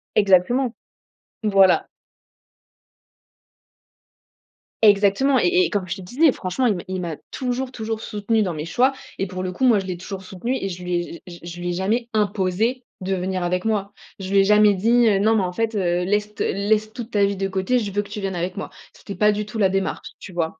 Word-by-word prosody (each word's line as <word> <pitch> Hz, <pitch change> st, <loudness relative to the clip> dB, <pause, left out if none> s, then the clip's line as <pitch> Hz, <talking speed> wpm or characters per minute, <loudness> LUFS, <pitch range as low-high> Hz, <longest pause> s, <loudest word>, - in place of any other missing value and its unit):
Exactement! 215 Hz, +6 st, +3 dB, 0.7 s
Voilà! 195 Hz, -3 st, +4 dB, 3.0 s
Exactement 210 Hz, +6 st, +4 dB
et 365 Hz, +1 st, +3 dB
et -, -, -2 dB
comme 195 Hz, -3 st, -2 dB
je 190 Hz, -, -4 dB
te -, -, -9 dB
disais, 265 Hz, -, +3 dB
franchement, 185 Hz, +4 st, -2 dB
il 220 Hz, -4 st, +3 dB
m'a 175 Hz, -, -6 dB
il 185 Hz, -1 st, -3 dB
m'a 170 Hz, -3 st, -4 dB
toujours, 255 Hz, 0 st, -3 dB
toujours 220 Hz, -2 st, -4 dB
soutenue 215 Hz, +1 st, -1 dB
dans 180 Hz, -5 st, -1 dB
mes 150 Hz, 0 st, -4 dB
choix 245 Hz, +11 st, +2 dB, 0.3 s
et 195 Hz, -, -1 dB
pour 185 Hz, 0 st, -5 dB
le 185 Hz, -, -2 dB
coup, 185 Hz, -, -5 dB
moi, 235 Hz, -4 st, +5 dB
je 195 Hz, -, -2 dB
l'ai 185 Hz, -1 st, -3 dB
toujours 190 Hz, +2 st, -7 dB
soutenu 195 Hz, +7 st, -3 dB
et 195 Hz, -, -3 dB
je 180 Hz, -1 st, -7 dB
lui 180 Hz, 0 st, -3 dB
ai 175 Hz, -, 0 dB
j 170 Hz, 0 st, -10 dB
j 175 Hz, -1 st, -10 dB
je 170 Hz, 0 st, -8 dB
lui 175 Hz, 0 st, -3 dB
ai -, -, -1 dB
jamais 220 Hz, +7 st, -1 dB
imposé 210 Hz, +4 st, 0 dB, 0.2 s
de 190 Hz, +1 st, -2 dB
venir 185 Hz, 0 st, -2 dB
avec 180 Hz, +1 st, -1 dB
moi. 205 Hz, -2 st, -1 dB, 0.3 s
Je 190 Hz, 0 st, -6 dB
lui 200 Hz, -, +5 dB
ai -, -, +6 dB
jamais 210 Hz, +1 st, +5 dB
dit, 230 Hz, +5 st, +3 dB
heu: 200 Hz, -3 st, +3 dB
«Non, 220 Hz, +3 st, +3 dB
mais 205 Hz, -, +2 dB
en 180 Hz, -, -2 dB
fait, 225 Hz, +3 st, -1 dB
heu, 180 Hz, -3 st, +1 dB
laisse 210 Hz, +2 st, 0 dB
t -, -, -1 dB
laisse 215 Hz, +2 st, 0 dB
toute 240 Hz, -1 st, -7 dB
ta 205 Hz, -2 st, +3 dB
vie 200 Hz, -1 st, -1 dB
de 195 Hz, -, -1 dB
côté, 190 Hz, +6 st, 0 dB
je 210 Hz, -4 st, -2 dB
veux 205 Hz, +2 st, 0 dB
que 200 Hz, -, -12 dB
tu 205 Hz, 0 st, -6 dB
viennes 195 Hz, -1 st, -3 dB
avec 180 Hz, +3 st, -3 dB
moi». 200 Hz, -, -5 dB, 0.2 s
C'était 200 Hz, -, -9 dB
pas 210 Hz, 0 st, +4 dB
du 210 Hz, 0 st, -2 dB
tout 215 Hz, +2 st, -6 dB
la 195 Hz, -2 st, +4 dB
démarche, 195 Hz, 0 st, -2 dB
tu -, -, -10 dB
vois? 165 Hz, -2 st, -2 dB
200 Hz, 225 wpm, -22 LUFS, 185-220 Hz, 3.0 s, ai